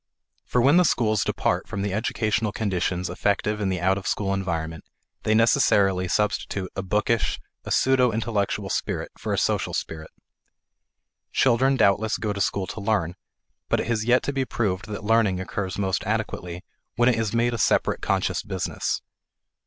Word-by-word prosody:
For 125 - +1
when 140 +6 +6
the 180 - +6
schools 110 - +2
depart - - -1
from 100 - -4
the 100 -2 -2
educational 110 0 0
conditions 90 -3 -1
effective 105 +3 -1
in 100 - 0
the 95 -1 -1
out 95 +3 +2
of 95 - -8
school 100 -2 0
environment, 80 -4 -3 0.4
they 110 - +1
necessarily 100 -4 +3
substitute 95 -1 -1
a - - -2
bookish, 105 +3 0 0.3
a - - -6
pseudo 130 -2 +3
intellectual 110 -2 -1
spirit - - -2
for - - -4
a - - 0
social - - 0
spirit. 80 -1 -5 1.2
Children 130 +2 +3
doubtless 105 -1 +2
go 105 -2 -2
to 100 - -4
school 95 0 0
to 100 - -7
learn, 100 -5 0 0.6
but - - +2
it - - -1
has 115 -2 0
yet 125 +2 +3
to 140 - -2
be 135 -1 0
proved 100 -7 -2
that 105 0 -6
learning 105 -4 +2
occurs 95 0 -4
most 95 -2 -1
adequately 90 0 -3 0.3
when 120 - +3
it 125 - +5
is 115 -1 -1
made 120 +1 +2
a 115 - -3
separate - - +2
conscious - - 0
business. - - -3
105 Hz, 170 wpm, -24 LUFS, 95-115 Hz, 1.2 s, when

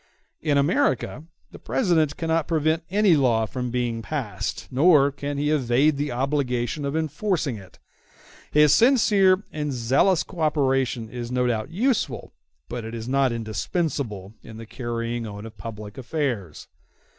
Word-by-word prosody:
In 150 -3 +1
America 160 - +1 0.3
the - - -12
President 160 - +1
cannot 165 -1 0
prevent 160 0 +1
any 200 -2 +4
law 120 -6 +2
from 125 +3 -4
being 120 -2 -2
passed, 110 -7 -4
nor 140 0 +5
can 145 +1 -5
he 150 +1 0
evade 140 +1 +2
the 145 0 -2
obligation 130 0 -1
of 140 +2 -2
enforcing 160 - -1
it. 95 -2 -14 0.7
His 150 -1 +5
sincere 205 -6 +4
and 150 -1 -3
zealous 135 +8 +2
co 180 - -12
operation 135 -6 +1
is 120 +1 -6
no 125 0 +1
doubt 110 -3 -1
useful, 185 - -1 0.3
but 120 -1 -5
it 115 +1 -6
is 115 0 -6
not 135 0 +2
indispensable, 110 - -3
in 110 - -11
the 115 - -8
carrying 115 0 -4
on 105 +1 -8
of 110 -1 -10
public 105 +2 -8
affairs. 120 - -3
135 Hz, 145 wpm, -24 LUFS, 115-155 Hz, 0.7 s, nor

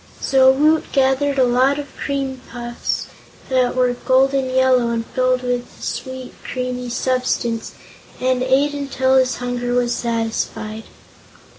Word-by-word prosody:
So 265 -1 +4
Woot 305 +4 +2
gathered 275 +1 +2
a 260 - +5
lot 255 +3 +3
of 290 - -4
the - - -20
cream 270 -2 -3
puffs 240 0 -3 0.4
that 255 -2 +2
were 250 -1 +2
golden 265 +1 +2
yellow 255 -2 +3
and 230 -1 -2
filled 255 +1 0
with 245 0 -1
a - - -11
sweet, 260 -1 -5
creamy 250 -1 -4
substance, 245 -2 -1 0.5
and 255 0 +1
ate 270 +3 +2
until 270 -2 0
his 260 -1 +3
hunger 245 0 -2
was 245 -1 +1
satisfied. 225 -2 -3
255 Hz, 140 wpm, -20 LUFS, 245-265 Hz, 0.5 s, a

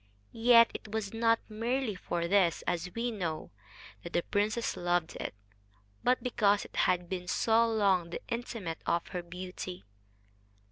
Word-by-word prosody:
Yet 230 0 +6
it - - -7
was 220 -2 -3
not 230 0 +3
merely 230 +2 -1
for 170 -2 -3
this, 185 -3 +3
as 175 +1 -1
we 235 +1 -1
know, 170 -7 -4 0.5
that 170 - -9
the 175 - +2
princess 215 +3 0
loved 175 -2 0
it, - - -5 0.7
but 250 +1 +2
because 205 -5 +2
it - - -14
had 180 -1 +2
been 180 0 -4
so 230 +4 +3
long 195 -6 +2
the - - -5
intimate 230 -8 -4
of 170 0 0
her 180 - -3
beauty. 180 - -7
200 Hz, 150 wpm, -31 LUFS, 175-230 Hz, 0.7 s, Yet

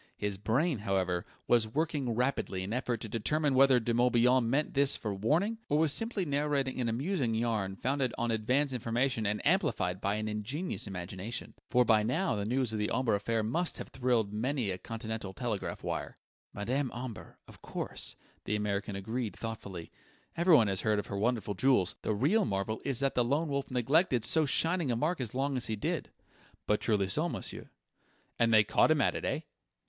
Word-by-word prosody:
His 100 -2 -2
brain, 125 - +1
however, 95 -3 -1 0.2
was 115 -2 +4
working 140 -2 -1
rapidly 125 -7 -1
in 100 +4 -4
effort 125 -2 -1
to - - -4
determine 140 +7 0
whether 130 -1 +6
De 120 0 -1
Morbihan 120 0 +3
meant 145 +5 0
this 140 0 +3
for 105 -2 -3
warning, 165 - +1
or 145 - +3
was 155 -2 +4
simply 225 -3 0
narrating 140 -3 0
an 120 - 0
amusing 130 - 0
yarn 110 -4 -1
founded 130 +3 0
on 120 0 0
advance 130 +6 +1
information 120 -1 0
and 105 +1 -2
amplified 125 - +1
by 100 +1 0
an 110 0 -2
ingenious 110 - -3
imagination. 95 +4 -5 0.2
For 125 -1 +4
by 110 -2 +5
now 160 - 0
the 100 -1 -2
news 125 -1 0
of 110 - -2
the 105 - 0
Omber 125 -2 +1
affair 110 +2 0
must 165 +11 0
have - - -7
thrilled 120 -5 0
many 120 -1 -1
a 90 - -4
Continental 110 -3 -5
telegraph 110 -2 -3
wire.... - - -4 0.3
"Madame 125 +7 -1
Omber 120 -3 -7
of - - -15
course!" - - -5 0.3
the 105 - 0
American 100 -1 -2
agreed 110 +3 -3
thoughtfully. 100 -7 -6 0.4
"Everyone 165 -9 +5
has 95 -2 0
heard 110 -1 +2
of 105 - -2
her 100 - -5
wonderful 110 -2 0
jewels. 100 -3 +2
The 110 - -1
real 160 - +3
marvel 100 - -2
is 135 -2 -1
that 135 -1 +2
the 125 - +3
Lone 145 +6 0
Wolf 140 -1 -2
neglected 125 - +2
so 160 -2 +3
shining 165 +1 +1
a 120 - +1
mark 155 +5 0
as 120 -1 -4
long 135 +1 0
as 125 - -1
he 110 - -1
did." 105 - -2 0.6
"But 105 - +1
truly 105 -4 +2
so, 155 - 0
monsieur!" 110 - -6 0.7
"And 115 -1 +4
they 110 -1 +7
caught 105 - +3
him 155 -1 +4
at - - +2
it, - - -4
eh?" - - -1
120 Hz, 190 wpm, -31 LUFS, 105-140 Hz, 0.7 s, they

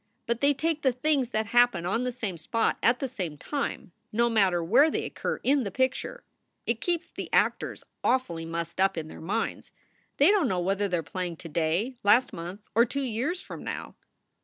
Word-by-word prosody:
But 235 0 -1
they 285 0 +4
take 320 +1 -1
the 260 - +3
things 265 0 +1
that 220 -3 0
happen 240 -6 +3
on 230 +7 0
the 250 - 0
same 220 -7 -4
spot 225 +8 0
at 235 +2 +4
the 270 - -2
same 180 -11 -5
time, 280 - -4 0.2
no 235 +2 +2
matter 190 -6 +3
where 250 - +5
they - - -2
occur - - -3
in 280 +1 +3
the 200 - -2
picture. 260 - -1 0.4
It 230 -1 -1
keeps 350 -1 0
the - - -7
actors - - +1 0.2
awfully 175 -11 +1
mussed 170 +2 -3
up 195 -1 +3
in 155 -1 -4
their - - -10
minds. 205 +8 -2 0.5
They 295 +7 +6
don 405 -7 +3
t - - +1
know 185 - 0
whether 195 +3 0
they 180 -2 0
re 165 - -3
playing 175 +3 -4
to 165 +1 -10
day, 170 - 0
last 235 +5 +4
month, 180 +3 -6
or 230 - +6
two 275 +3 -2
years 260 - -2
from - - -8
now. - - -5
230 Hz, 210 wpm, -28 LUFS, 180-260 Hz, 0.5 s, They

